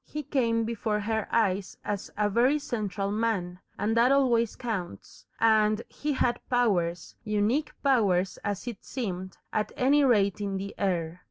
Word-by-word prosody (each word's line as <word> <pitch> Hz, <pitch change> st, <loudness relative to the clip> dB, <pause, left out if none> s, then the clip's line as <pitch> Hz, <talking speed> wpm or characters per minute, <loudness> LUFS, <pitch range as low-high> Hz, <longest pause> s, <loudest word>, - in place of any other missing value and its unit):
He 300 Hz, 0 st, -6 dB
came 235 Hz, -5 st, +1 dB
before 220 Hz, -2 st, -1 dB
her 220 Hz, 0 st, -1 dB
eyes 200 Hz, -4 st, 0 dB
as 205 Hz, -1 st, -3 dB
a 210 Hz, 0 st, +2 dB
very 245 Hz, +8 st, +3 dB
central 210 Hz, -8 st, -3 dB
man, 205 Hz, -5 st, -1 dB, 0.2 s
and 220 Hz, +2 st, 0 dB
that 235 Hz, +3 st, +5 dB
always 240 Hz, -5 st, +3 dB
counts, 195 Hz, -, -6 dB
and 215 Hz, -1 st, +4 dB
he 295 Hz, 0 st, -3 dB
had 240 Hz, -2 st, 0 dB
powers, 185 Hz, -9 st, 0 dB
unique 215 Hz, +7 st, 0 dB
powers 195 Hz, -9 st, +2 dB
as 205 Hz, +1 st, -3 dB
it 235 Hz, -5 st, -6 dB
seemed, 190 Hz, -7 st, -5 dB, 0.2 s
at 210 Hz, 0 st, 0 dB
any 285 Hz, +3 st, +4 dB
rate 205 Hz, -6 st, +3 dB
in 200 Hz, -1 st, -2 dB
the 195 Hz, +1 st, -5 dB
air. 175 Hz, -3 st, -1 dB
215 Hz, 155 wpm, -28 LUFS, 195-240 Hz, 0.2 s, that